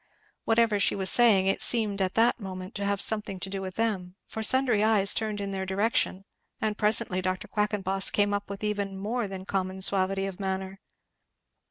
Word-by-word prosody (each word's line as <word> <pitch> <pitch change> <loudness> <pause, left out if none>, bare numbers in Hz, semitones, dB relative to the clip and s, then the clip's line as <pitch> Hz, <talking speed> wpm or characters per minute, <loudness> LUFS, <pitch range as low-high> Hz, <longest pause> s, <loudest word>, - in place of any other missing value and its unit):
Whatever 225 -2 +2
she - - +2
was 190 -1 +3
saying 220 -6 +5
it 195 - 0
seemed 210 -4 +1
at 185 -1 -1
that 235 +2 +3
moment 185 -1 -7
to 200 - -4
have 200 0 -1
something 210 -3 +1
to 190 +1 -5
do 195 -1 -4
with 185 -1 -7
them, 195 -5 -2
for 220 - -6
sundry 245 -2 +2
eyes 210 -3 +4
turned 215 -2 -2
in 200 -1 -4
their 190 -1 -3
direction; 195 0 -1 0.3
and 215 -1 -1
presently 210 -3 +2
Dr. 185 0 -3
Quackenboss 195 -2 0
came 205 0 +1
up, 205 0 -3
with 200 +1 -7
even 200 -2 -3
more 220 +3 -3
than 190 -1 -8
common 190 -1 -3
suavity 195 0 +1
of 195 -1 -7
manner. 190 0 -4
200 Hz, 190 wpm, -27 LUFS, 190-215 Hz, 0.3 s, saying